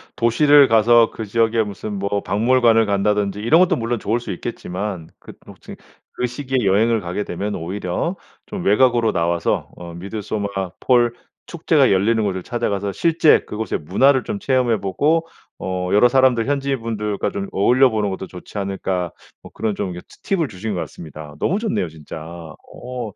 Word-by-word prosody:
도시를 140 Hz, +4 st, +5 dB
가서 115 Hz, 0 st, +5 dB
그 110 Hz, -, -6 dB
지역에 115 Hz, +1 st, +1 dB
무슨 105 Hz, 0 st, -6 dB
뭐 100 Hz, 0 st, -1 dB
박물관을 115 Hz, +2 st, +3 dB
간다든지 100 Hz, 0 st, 0 dB
이런 130 Hz, +11 st, +4 dB
것도 180 Hz, -1 st, +3 dB
물론 115 Hz, -3 st, -2 dB
좋을 115 Hz, +4 st, -1 dB
수 115 Hz, -4 st, -6 dB
있겠지만 90 Hz, -1 st, -5 dB
그 -, -, -12 dB
뭐 -, -, -12 dB
저기 -, -, -10 dB, 0.4 s
그 125 Hz, -, -2 dB
시기에 130 Hz, -1 st, -2 dB
여행을 110 Hz, +4 st, +3 dB
가게 90 Hz, +3 st, -3 dB
되면 100 Hz, +4 st, -4 dB
오히려 90 Hz, -, -3 dB, 0.3 s
좀 190 Hz, -, -5 dB
외곽으로 120 Hz, +1 st, +3 dB
나와서 85 Hz, 0 st, -1 dB
어 85 Hz, -1 st, -9 dB
'미드소마 100 Hz, +3 st, -4 dB, 0.3 s
폴 120 Hz, -2 st, +3 dB, 0.3 s
축제가 155 Hz, -5 st, +2 dB
열리는 110 Hz, +4 st, +2 dB
곳을 95 Hz, -2 st, -2 dB
찾아가서 100 Hz, -4 st, -2 dB
실제 165 Hz, -, +4 dB
그곳의 110 Hz, +1 st, -3 dB
문화를 130 Hz, -, +3 dB
좀 210 Hz, -2 st, -4 dB
체험해 125 Hz, -, +1 dB
보고 150 Hz, -, +1 dB, 0.3 s
어 90 Hz, -1 st, -3 dB
여러 115 Hz, +4 st, +6 dB
사람들 130 Hz, -2 st, +3 dB
현지인 140 Hz, -3 st, -1 dB
분들과 105 Hz, -3 st, -2 dB
좀 100 Hz, -1 st, -4 dB
어울려 125 Hz, +7 st, +4 dB
보는 105 Hz, -3 st, -1 dB
것도 95 Hz, 0 st, -5 dB
좋지 90 Hz, +3 st, -11 dB
않을까.' 95 Hz, -3 st, -2 dB, 0.3 s
뭐 -, -, -12 dB
그런 110 Hz, -2 st, -2 dB
좀 95 Hz, -2 st, -3 dB
이거 90 Hz, -, -7 dB, 0.2 s
티 195 Hz, -, 0 dB
팁을 165 Hz, -5 st, 0 dB
주신 105 Hz, 0 st, -5 dB
것 90 Hz, -, -3 dB
같습니다. 75 Hz, -2 st, -9 dB
너무 195 Hz, +5 st, 0 dB
좋네요 210 Hz, -, -1 dB
진짜. 80 Hz, 0 st, -10 dB
어 100 Hz, +8 st, -8 dB
110 Hz, 365 characters per minute, -20 LUFS, 95-125 Hz, 0.4 s, 여러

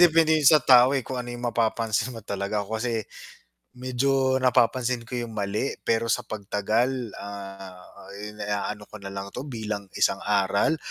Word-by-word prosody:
depende 165 Hz, -2 st, +6 dB
'yon 150 Hz, -3 st, +6 dB
sa 155 Hz, -4 st, +5 dB
tao, 130 Hz, +1 st, +7 dB
eh, 130 Hz, -, -2 dB
kung 130 Hz, -1 st, -4 dB
ano 120 Hz, -, -7 dB
'yong 120 Hz, 0 st, -6 dB
mapapansin 115 Hz, +1 st, 0 dB
mo 110 Hz, -, -10 dB
talaga. 100 Hz, 0 st, -2 dB
Ako 110 Hz, +2 st, -4 dB
kasi 115 Hz, -3 st, -1 dB, 0.8 s
medyo 130 Hz, +1 st, +1 dB
napapansin 125 Hz, -1 st, +2 dB
ko 125 Hz, -, -4 dB
'yong 120 Hz, -2 st, -4 dB
mali, 105 Hz, +5 st, -1 dB
pero 115 Hz, 0 st, +1 dB
sa -, -, +1 dB
pagtagal, 110 Hz, +4 st, -1 dB, 0.2 s
ah, 95 Hz, -2 st, -8 dB, 0.5 s
iniaano 105 Hz, 0 st, -4 dB
ko 105 Hz, 0 st, -12 dB
na 100 Hz, -, -7 dB
lang 100 Hz, 0 st, -6 dB
ito -, -, -5 dB
bilang 110 Hz, -7 st, -5 dB
isang 100 Hz, -, +2 dB
aral. 100 Hz, +9 st, +2 dB
115 Hz, 165 wpm, -26 LUFS, 100-130 Hz, 0.8 s, tao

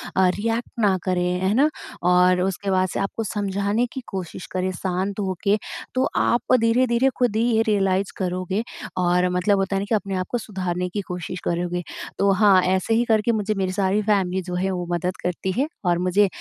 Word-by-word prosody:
अ, 190 Hz, -1 st, +4 dB
react 230 Hz, +3 st, -2 dB
ना 200 Hz, -4 st, +3 dB
करें। 185 Hz, -2 st, 0 dB, 0.2 s
है 190 Hz, +2 st, +1 dB
ना? 285 Hz, +7 st, +4 dB, 0.3 s
और 180 Hz, 0 st, +4 dB
उसके 195 Hz, +1 st, -1 dB
बाद 185 Hz, 0 st, +2 dB
से -, -, -3 dB
आपको 195 Hz, +3 st, -2 dB
समझाने 205 Hz, +3 st, 0 dB
की 265 Hz, -, -5 dB
कोशिश 185 Hz, -2 st, -6 dB
करें, 185 Hz, 0 st, -1 dB
शांत 190 Hz, +3 st, -2 dB
होके, 200 Hz, +2 st, 0 dB, 0.4 s
तो 255 Hz, -, +2 dB
आप 240 Hz, +1 st, +2 dB
धीरे-धीरे 235 Hz, +2 st, +3 dB
खुद 245 Hz, -4 st, +1 dB
ही 220 Hz, -, +2 dB
ये 225 Hz, -, +4 dB
रियलाइज़ 195 Hz, -2 st, +1 dB
करोगे 185 Hz, +2 st, -2 dB, 0.3 s
और 180 Hz, 0 st, +2 dB
मतलब 185 Hz, +3 st, +2 dB
होता 195 Hz, 0 st, 0 dB
है -, -, +1 dB
ना -, -, -3 dB
कि 225 Hz, -, +3 dB
अपने 195 Hz, -1 st, -2 dB
आप 185 Hz, -, -1 dB
को 245 Hz, -, 0 dB
सुधारने 185 Hz, -4 st, -3 dB
की 205 Hz, +3 st, -3 dB
कोशिश 180 Hz, 0 st, -5 dB
करोगे। 175 Hz, +1 st, -1 dB, 0.4 s
तो 200 Hz, 0 st, +4 dB
हाँ, 195 Hz, -2 st, +5 dB
ऐसे 190 Hz, +4 st, +1 dB
ही 230 Hz, -, +3 dB
करके 220 Hz, 0 st, +2 dB
मुझे 215 Hz, -1 st, 0 dB
मेरी 190 Hz, -1 st, 0 dB
सारी 195 Hz, +1 st, +1 dB
फैमिली 190 Hz, -3 st, +1 dB
जो 180 Hz, 0 st, -5 dB
है 190 Hz, +2 st, 0 dB
वो 180 Hz, -1 st, -3 dB
मदद 180 Hz, +2 st, -1 dB
करती 180 Hz, +1 st, -2 dB
है, 280 Hz, -, +2 dB, 0.2 s
और 175 Hz, -1 st, +3 dB
मुझे 185 Hz, +3 st, +3 dB
190 Hz, 200 wpm, -23 LUFS, 180-210 Hz, 0.4 s, हाँ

